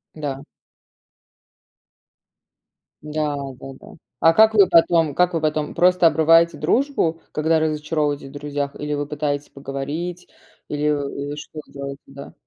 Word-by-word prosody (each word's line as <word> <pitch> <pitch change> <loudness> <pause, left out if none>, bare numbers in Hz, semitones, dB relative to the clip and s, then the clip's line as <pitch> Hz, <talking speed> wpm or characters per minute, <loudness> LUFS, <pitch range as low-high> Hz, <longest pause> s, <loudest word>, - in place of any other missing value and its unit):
Да. 140 -3 -5 2.6
Да, 150 -1 -2 0.2
да, 135 0 -9
да. - - -16 0.3
А 165 - +5
как 220 +4 +5
вы 200 -3 +6
потом, 165 -3 +4
как 180 0 +2
вы 165 - -1
потом? 155 -1 -1
Просто 180 0 +4
обрываете 165 +2 +4
дружбу, 250 - 0
когда 160 +1 +2
разочаровываетесь 150 -2 -1
в - - -14
друзьях? 145 0 -4
Или 150 0 -3
вы 145 0 -2
пытаетесь 145 -1 -3
поговорить, 145 +6 -5 0.4
или 150 0 -3
или 145 -1 -2
что 150 +1 -9
вы - - -22
делаете, 140 0 -7
да? 140 0 -11
150 Hz, 135 wpm, -21 LUFS, 145-165 Hz, 2.6 s, вы